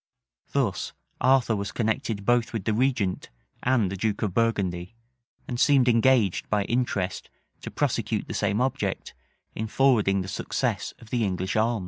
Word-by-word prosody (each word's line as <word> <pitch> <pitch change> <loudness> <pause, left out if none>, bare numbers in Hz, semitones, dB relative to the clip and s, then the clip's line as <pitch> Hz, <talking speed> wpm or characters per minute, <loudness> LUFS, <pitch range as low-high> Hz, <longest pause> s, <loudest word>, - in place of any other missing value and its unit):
Thus 115 -11 -1 0.3
Arthur 130 -3 +4
was 100 0 -3
connected 110 -2 -2
both 120 0 +2
with 110 -4 -3
the 110 - +1
regent 115 -5 0 0.3
and 120 -7 +2
the - - -3
duke 105 +2 -1
of 100 -4 -1
Burgundy, 100 -4 0 0.5
and 120 -2 -4
seemed 135 -3 +4
engaged 115 -4 +3
by 105 -1 +2
interest 100 -5 -2 0.3
to - - -6
prosecute - - -1
the - - -5
same 105 +4 0
object, 130 -7 -2 0.4
in 110 - -3
forwarding 110 -6 +3
the - - -8
success - - -2
of 115 -3 -16
the 120 -2 +1
English 95 -1 -2
arms. 115 +1 +2
110 Hz, 155 wpm, -26 LUFS, 100-125 Hz, 0.5 s, Arthur